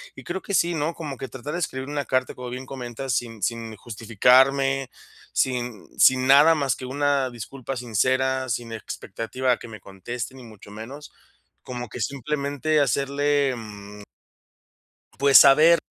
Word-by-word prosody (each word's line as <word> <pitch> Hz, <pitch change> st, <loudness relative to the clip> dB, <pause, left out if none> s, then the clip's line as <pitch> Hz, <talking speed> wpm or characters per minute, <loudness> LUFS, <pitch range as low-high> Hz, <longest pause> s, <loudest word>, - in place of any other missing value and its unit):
Y -, -, -11 dB
creo, 185 Hz, +2 st, -4 dB
que 200 Hz, -, -6 dB
sí, 175 Hz, -2 st, +2 dB
¿no? 155 Hz, +2 st, -1 dB
Como 150 Hz, -5 st, -7 dB
que 135 Hz, -, -6 dB
tratar 130 Hz, +3 st, -8 dB
de 175 Hz, -, -3 dB
escribir 135 Hz, -5 st, -4 dB
una 145 Hz, -1 st, -3 dB
carta, 130 Hz, -1 st, 0 dB
como 125 Hz, -1 st, -8 dB
bien 125 Hz, +2 st, -6 dB
comentas, 130 Hz, -1 st, -5 dB
sin 115 Hz, -3 st, -5 dB
sin 115 Hz, 0 st, -3 dB
justificarme, 130 Hz, +5 st, +2 dB, 0.4 s
sin 125 Hz, -4 st, -2 dB
sin 130 Hz, 0 st, +5 dB
nada 145 Hz, +5 st, +7 dB
más, 140 Hz, -4 st, 0 dB
que 130 Hz, -, -7 dB
una 140 Hz, 0 st, 0 dB
disculpa 130 Hz, +3 st, -7 dB
sincera. 130 Hz, +3 st, 0 dB
Sin 120 Hz, -1 st, -3 dB
expectativa 115 Hz, +3 st, -3 dB
a 120 Hz, -, +2 dB
que -, -, -11 dB
me 110 Hz, -2 st, -11 dB
conteste, 105 Hz, +6 st, -7 dB
ni 130 Hz, -, -12 dB
mucho 110 Hz, -3 st, -14 dB
menos. 125 Hz, +8 st, -9 dB, 0.5 s
Como 125 Hz, -2 st, -6 dB
que -, -, -8 dB
simplemente, 145 Hz, +2 st, -1 dB
hacerle, 140 Hz, +1 st, +1 dB
mm 105 Hz, -2 st, -10 dB, 1.1 s
pues 140 Hz, 0 st, +7 dB
saber, 160 Hz, +5 st, +7 dB
130 Hz, 160 wpm, -24 LUFS, 120-140 Hz, 1.1 s, nada